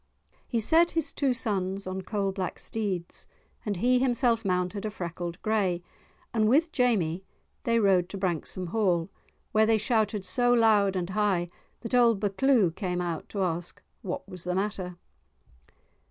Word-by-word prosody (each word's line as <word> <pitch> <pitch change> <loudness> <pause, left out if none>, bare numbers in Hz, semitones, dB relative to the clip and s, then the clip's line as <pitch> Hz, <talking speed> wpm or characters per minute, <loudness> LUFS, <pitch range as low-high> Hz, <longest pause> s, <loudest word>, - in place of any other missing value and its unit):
He 235 - 0
set 330 +9 +4
his 325 - +3
two 275 -3 +1
sons 195 -5 -2
on 185 +1 -4
coal 195 0 -2
black 190 -2 -4
steeds, 195 -6 -4 0.4
and 205 -3 -2
he 250 +6 +3
himself 240 -2 +2
mounted 180 +1 -1
a 215 - -2
freckled 175 -3 -5
grey, 195 -5 0 0.5
and 215 -2 +2
with 315 +6 +3
Jamie 195 - +1 0.4
they 230 -1 +2
rode 190 -4 +3
to 200 - -6
Branksome 180 -1 -2
Hall, 185 -4 +1 0.4
where 220 0 +4
they 225 0 +4
shouted 210 -2 0
so 245 +6 +2
loud 210 -4 +4
and 180 0 -2
high 185 -4 0 0.3
that 230 - -6
old 235 -4 +4
Buccleuch 205 -3 +2
came 180 -4 -2
out 170 -3 -4
to 200 -2 -2
ask 175 -1 -3 0.2
what 185 0 -5
was 180 -3 -9
the 180 0 -2
matter. 190 -3 -3
200 Hz, 155 wpm, -28 LUFS, 180-225 Hz, 0.5 s, set